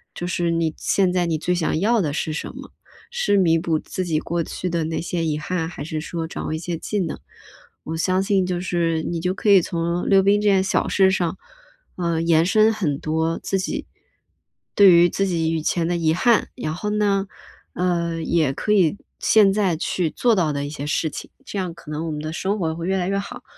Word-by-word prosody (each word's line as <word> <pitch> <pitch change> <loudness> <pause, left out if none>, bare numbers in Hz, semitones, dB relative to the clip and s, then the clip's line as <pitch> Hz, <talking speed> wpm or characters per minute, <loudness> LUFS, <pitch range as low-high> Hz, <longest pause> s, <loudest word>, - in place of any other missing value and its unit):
就 175 - -4
是 175 -1 0
你 165 -1 0
现 190 -2 +1
在 180 -1 +1
你 165 -2 0
最 180 +3 -1
想 160 -2 0
要 220 +4 +2
的 155 -5 -1
是 155 +1 -2
什 150 - -4
么， - - -10 0.4
是 480 - +1
弥 165 -3 +4
补 160 -1 0
自 185 - -5
己 160 -4 0
过 170 +1 -2
去 180 - -4
的 170 -1 -1
那 160 +1 -2
些 170 0 -2
遗 155 -2 -1
憾？ 165 +1 -2
还 160 - -7
是 155 -1 -4
说 165 0 -4
掌 - - -6
握 - - -2
一 - - -1
些 170 +1 -4
技 205 +5 -3
能？ 180 - -2 0.7
我 160 - -5
相 185 +3 +1
信 195 -1 +1
就 180 -1 -2
是， 170 -3 -1
你 170 +1 -3
就 180 +2 0
可 205 - -1
以 195 -2 +7
从 170 +1 -2
溜 195 -1 +6
冰 205 +1 +3
这 210 - +3
件 195 -1 +4
小 190 - 0
事 190 -1 +4
上， 180 -1 -1 0.6
啊， 170 -2 -1
延 165 0 +3
伸 215 +3 +4
很 155 -10 -1
多， 160 +1 -1
自 195 - -1
己 185 - -3 0.9
对 200 -2 +8
于 170 0 +6
自 195 - 0
己 165 -3 0
以 160 - -1
前 165 +1 0
的 175 - 0
遗 160 -2 +1
憾， 230 +7 +2
然 155 -11 -3
后 210 +5 -4
呢， 205 -2 +1 0.5
呃， 170 -2 -1
也 160 -4 +1
可 210 +9 -1
以 190 -2 +3 0.2
现 205 -3 +5
在 195 -5 +1
去 170 +1 -1
做 235 +7 +2
到 170 -6 +1
的 140 0 -3
一 - - -5
些 145 -1 -6
事 160 +2 0
情， - - -8 0.2
这 210 - -6
样 180 -3 -3
可 160 -2 -12
能 155 +2 -3
我 - - -3
们 150 - -4
的 155 +1 -5
生 195 +4 -2
活 160 -3 -1
会 170 +2 -5
越 190 - +1
来 180 -1 -1
越 195 +1 0
好， 200 - -8
175 Hz, 250 characters per minute, -22 LUFS, 160-190 Hz, 0.9 s, 对